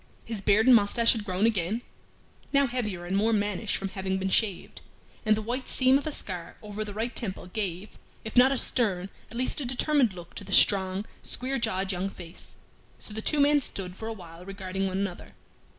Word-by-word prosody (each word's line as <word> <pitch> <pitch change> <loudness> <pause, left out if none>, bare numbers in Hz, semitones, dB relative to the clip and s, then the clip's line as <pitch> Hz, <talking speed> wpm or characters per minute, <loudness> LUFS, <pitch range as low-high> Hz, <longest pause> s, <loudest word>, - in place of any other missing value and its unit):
His 225 -4 -4
beard 210 +3 +4
and 255 -1 +8
mustache 230 +2 +5
had 220 - -1
grown 185 +1 0
again, 215 +1 0 0.7
(now 280 0 +4
heavier 210 -9 -3
and 185 +2 -2
more 215 +3 +3
mannish 205 0 0
from 195 - -3
having 190 -1 -2
been 190 0 -2
shaved), 200 -4 0 0.5
and 215 - +5
the 215 - -4
white 245 +4 -3
seam 260 +1 +4
of 285 - -6
a - - -1
scar 180 -10 -2
over 210 0 -5
the 205 -1 -8
right 230 +3 -2
temple 195 -7 -4
gave, 185 0 -5 0.3
if 220 - -7
not 255 +2 +7
a 275 - +1
stern, 195 -8 +2 0.2
at 235 - -9
least 255 +4 0
a - - -2
determined 260 -2 +2
look 175 -1 -11
to - - -7
the 195 0 -6
strong, 190 0 +4 0.2
square 265 +2 -3
jawed 195 -4 0
young 185 +1 -2
face. 175 -3 -11 0.4
So 210 - -11
the 220 - -4
two 290 +3 +3
stood 185 -8 -4
for 220 - -7
a 225 - -3
while 175 -4 -11
regarding 195 0 -3
one 190 0 -2
another. 195 -3 -4
205 Hz, 205 wpm, -27 LUFS, 190-235 Hz, 0.7 s, and